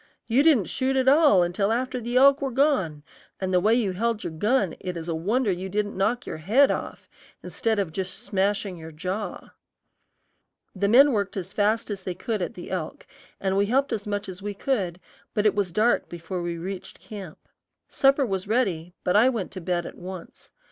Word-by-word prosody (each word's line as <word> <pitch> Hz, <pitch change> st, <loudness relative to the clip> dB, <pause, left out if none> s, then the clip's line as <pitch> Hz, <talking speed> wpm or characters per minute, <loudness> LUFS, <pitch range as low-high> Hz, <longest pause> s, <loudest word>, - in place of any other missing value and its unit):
you 245 Hz, +4 st, +3 dB
didn't 285 Hz, -, +4 dB
shoot 260 Hz, +10 st, -1 dB
at 260 Hz, 0 st, +1 dB
all 280 Hz, -, +6 dB
until 190 Hz, +4 st, 0 dB
after 255 Hz, +1 st, -1 dB
the 240 Hz, +2 st, -1 dB
elk 275 Hz, +2 st, +6 dB
were 275 Hz, -, -1 dB
gone, 230 Hz, -, +1 dB, 0.4 s
and 190 Hz, -1 st, -2 dB
the 180 Hz, -, +5 dB
way 210 Hz, +5 st, +2 dB
you 230 Hz, -4 st, +2 dB
held 225 Hz, +3 st, -1 dB
your 160 Hz, -, -4 dB
gun 205 Hz, +2 st, +1 dB
it 180 Hz, -2 st, -5 dB
is 165 Hz, 0 st, -6 dB
a 170 Hz, -, -1 dB
wonder 205 Hz, +8 st, 0 dB
it 185 Hz, +1 st, -4 dB
didn't 205 Hz, +1 st, -2 dB
knock 225 Hz, +6 st, 0 dB
your -, -, -5 dB
head 225 Hz, -, +4 dB
off, -, -, -5 dB, 0.4 s
instead 225 Hz, -1 st, -1 dB
of 195 Hz, -5 st, -1 dB
just 190 Hz, +3 st, -4 dB
smashing 200 Hz, -3 st, -1 dB
your 160 Hz, 0 st, -9 dB
jaw." 185 Hz, +5 st, -5 dB, 1.2 s
The 200 Hz, +1 st, +1 dB
men 270 Hz, +7 st, +7 dB
worked 200 Hz, -4 st, -1 dB
as 190 Hz, 0 st, -5 dB
fast 215 Hz, +2 st, +1 dB
as 200 Hz, -2 st, -4 dB
they 185 Hz, -1 st, -4 dB
could 220 Hz, -2 st, -3 dB
at 175 Hz, -, -3 dB
the 175 Hz, -, -9 dB
elk, 180 Hz, -4 st, -4 dB, 0.3 s
and 190 Hz, -1 st, 0 dB
we 200 Hz, +1 st, +2 dB
helped 270 Hz, +5 st, +1 dB
as 210 Hz, -1 st, -4 dB
much 205 Hz, 0 st, -2 dB
as 185 Hz, 0 st, -8 dB
we 205 Hz, 0 st, -4 dB
could, 195 Hz, -8 st, -1 dB, 0.4 s
but 210 Hz, -, +1 dB
it 210 Hz, -, +5 dB
was 200 Hz, -4 st, -1 dB
dark 220 Hz, +7 st, +2 dB
before 175 Hz, +1 st, -5 dB
we 170 Hz, -1 st, -3 dB
reached 185 Hz, +2 st, -7 dB
camp. 195 Hz, -7 st, -9 dB, 0.5 s
Supper 275 Hz, 0 st, +3 dB
was 195 Hz, -3 st, -3 dB
ready, 185 Hz, -7 st, 0 dB
but 180 Hz, -, +1 dB
I 230 Hz, +5 st, +6 dB
went 225 Hz, -7 st, -3 dB
to 185 Hz, -, -7 dB
bed 175 Hz, 0 st, -1 dB
at -, -, -9 dB
once. 185 Hz, -1 st, -9 dB
200 Hz, 205 wpm, -25 LUFS, 180-235 Hz, 1.2 s, men